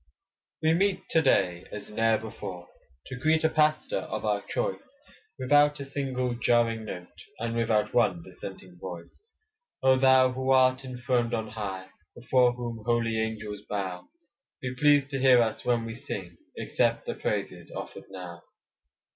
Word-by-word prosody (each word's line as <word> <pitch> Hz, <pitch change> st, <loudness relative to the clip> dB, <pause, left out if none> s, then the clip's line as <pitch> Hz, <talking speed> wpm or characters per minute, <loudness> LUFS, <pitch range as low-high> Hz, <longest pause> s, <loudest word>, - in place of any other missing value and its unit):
We 160 Hz, +1 st, +4 dB
meet 195 Hz, +3 st, +1 dB
to 160 Hz, -, +4 dB
day 90 Hz, -, +2 dB
as 105 Hz, 0 st, -8 dB
ne'er 115 Hz, +1 st, +3 dB
before, 100 Hz, -5 st, -7 dB, 0.4 s
To 135 Hz, -, -7 dB
greet 155 Hz, +5 st, +2 dB
a 160 Hz, -, +4 dB
pastor 155 Hz, -, +2 dB
of -, -, -5 dB
our -, -, +1 dB
choice, -, -, -2 dB, 0.6 s
Without 145 Hz, +2 st, +4 dB
a 140 Hz, -, -5 dB
single 130 Hz, -3 st, -2 dB
jarring 115 Hz, -1 st, +2 dB
note, 90 Hz, -4 st, -9 dB
And 115 Hz, 0 st, -3 dB
without 115 Hz, -2 st, +1 dB
one 100 Hz, -8 st, +2 dB
dissenting 95 Hz, 0 st, -10 dB
voice. 85 Hz, -2 st, -9 dB, 0.6 s
Oh 130 Hz, 0 st, +5 dB
thou 130 Hz, -1 st, +5 dB
who 130 Hz, +1 st, -3 dB
art 130 Hz, 0 st, +4 dB
enthroned 125 Hz, -2 st, -1 dB
on 110 Hz, -1 st, -3 dB
high, 95 Hz, -4 st, -5 dB, 0.3 s
Before 125 Hz, 0 st, +3 dB
whom 120 Hz, -2 st, -5 dB
holy 115 Hz, -1 st, +1 dB
angels 105 Hz, -2 st, -3 dB
bow, 95 Hz, -3 st, -4 dB, 0.5 s
Be 130 Hz, -1 st, -4 dB
pleased 145 Hz, +1 st, +3 dB
to 135 Hz, -, -2 dB
hear 130 Hz, -2 st, +6 dB
us 115 Hz, -2 st, 0 dB
when 120 Hz, -2 st, +1 dB
we 115 Hz, -, -5 dB
sing, 95 Hz, -7 st, -6 dB, 0.2 s
Accept -, -, 0 dB
the -, -, -2 dB
praises -, -, -3 dB
offered -, -, -7 dB
now. 90 Hz, -3 st, -8 dB
120 Hz, 155 wpm, -28 LUFS, 105-130 Hz, 0.6 s, hear